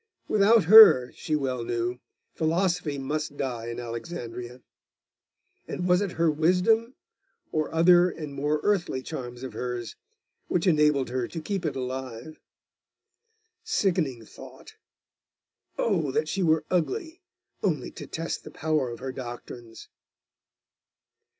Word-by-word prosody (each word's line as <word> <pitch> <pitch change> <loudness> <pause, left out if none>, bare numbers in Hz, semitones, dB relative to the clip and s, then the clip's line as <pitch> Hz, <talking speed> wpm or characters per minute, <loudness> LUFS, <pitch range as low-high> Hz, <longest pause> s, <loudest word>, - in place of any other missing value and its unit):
Without 215 +1 +4
her, 180 - +9
she 155 - -3
well 130 -4 -2
knew, 120 +1 -2 0.3
philosophy 165 -2 0
must 145 +2 -4
die 120 -4 -3
in 120 +1 -5
Alexandria. 120 0 -7 1.0
And 180 - -3
was 180 +1 +4
it 200 -3 -2
her 165 -1 +2
wisdom 185 - +2 0.6
or 155 -1 -1
other 175 +2 +5
and 155 -4 -7
more 145 +2 -1
earthly 175 -10 0
charms 125 -5 -7
of 130 - -6
hers 125 -2 -5 0.5
which 175 - 0
enabled 150 -6 +3
her 125 -2 -1
to 165 - -6
keep 180 +1 -3
it 140 - -3
alive? 130 +2 -6 1.2
Sickening 175 - 0
thought! - - -13 1.0
Oh, 175 -10 0
that 150 +4 0
she 195 +4 -2
were 160 -3 +2
ugly, 320 - -2 0.4
only - - -1
to - - -10
test 165 +1 -4
the - - -9
power 155 -5 -1
of 120 - -7
her 130 0 -4
doctrines! 120 -2 -9
155 Hz, 125 wpm, -26 LUFS, 125-180 Hz, 1.2 s, her